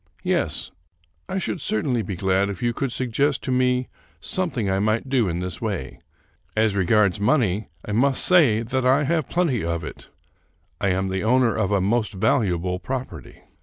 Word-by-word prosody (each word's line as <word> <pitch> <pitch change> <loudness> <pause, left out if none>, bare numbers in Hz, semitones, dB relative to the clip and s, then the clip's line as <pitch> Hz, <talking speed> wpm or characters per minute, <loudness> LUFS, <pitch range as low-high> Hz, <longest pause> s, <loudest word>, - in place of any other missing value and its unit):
" - - -32 0.2
Yes, - - -4 0.6
I 190 - -2
should 185 -3 -2
certainly 120 +2 0
be 100 -2 -4
glad 95 +2 +1
if 100 +3 -6
you 120 0 +1
could 135 +1 -2
suggest 130 +3 0
to 130 - -2
me 125 0 +1 0.3
something 170 - -1
I 95 0 +1
might 110 +5 0
do 125 -7 +2
in 85 +1 -2
this 90 -2 -5
way. 100 - -4 0.6
As 110 -1 +2
regards 100 0 +2
money, 105 -3 +1 0.2
I - - -5
may 130 +6 +3
say 130 -9 +4
that 130 +3 -1
I 130 +3 +4
have 160 0 0
plenty 165 - 0
of 85 0 -2
it. - - -9 0.7
I - - 0
am 95 0 0
the 95 0 -2
owner 125 +1 +3
of 105 -3 0
a 100 -2 +2
most 110 +3 0
valuable 95 -5 0
property. 130 +4 -6
110 Hz, 180 wpm, -23 LUFS, 95-130 Hz, 0.7 s, say